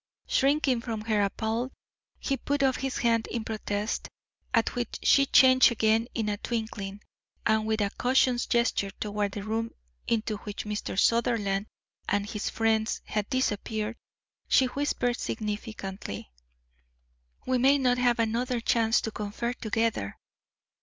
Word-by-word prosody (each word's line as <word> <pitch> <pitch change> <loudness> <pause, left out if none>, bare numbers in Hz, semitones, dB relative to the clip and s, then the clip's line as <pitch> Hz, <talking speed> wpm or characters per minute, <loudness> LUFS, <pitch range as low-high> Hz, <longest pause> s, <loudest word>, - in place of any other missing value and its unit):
Shrinking 275 -3 +2
from 225 -3 -4
her 215 -1 +1
appalled, 220 +5 -1 0.5
he 275 - -1
put 280 +2 -1
up 265 -1 +3
his 270 0 -2
hand 230 -1 +2
in 230 -1 -3
protest, 215 -1 -3 0.4
at 230 -1 +2
which 245 -1 -3
she 275 -1 +5
changed 255 -1 +7
again 225 0 +2
in 225 -3 -1
a 205 -1 -1
twinkling, 210 -3 -4 0.4
and 220 0 +2
with 220 0 +1
a 200 -1 +1
cautious 250 -1 +3
gesture 235 -4 +1
toward 205 -1 -2
the 205 - -5
room 225 +2 -2 0.4
into 220 -2 0
which 205 0 -6
Mr. 210 -2 -4
Sutherland 215 -3 +2 0.4
and 205 0 0
his 210 0 -3
friends 220 -1 +1
had 210 -1 -2
disappeared, 220 -3 -1 0.5
she 265 - +5
whispered 250 -2 -1
significantly: 205 - -5 1.1
"We 255 -1 +1
may 270 +3 +5
not 250 -2 +2
have 245 -1 +3
another 235 +2 0
chance 230 0 +2
to 225 - -3
confer 215 +3 -3
together. 225 - -1
225 Hz, 140 wpm, -28 LUFS, 210-245 Hz, 1.1 s, changed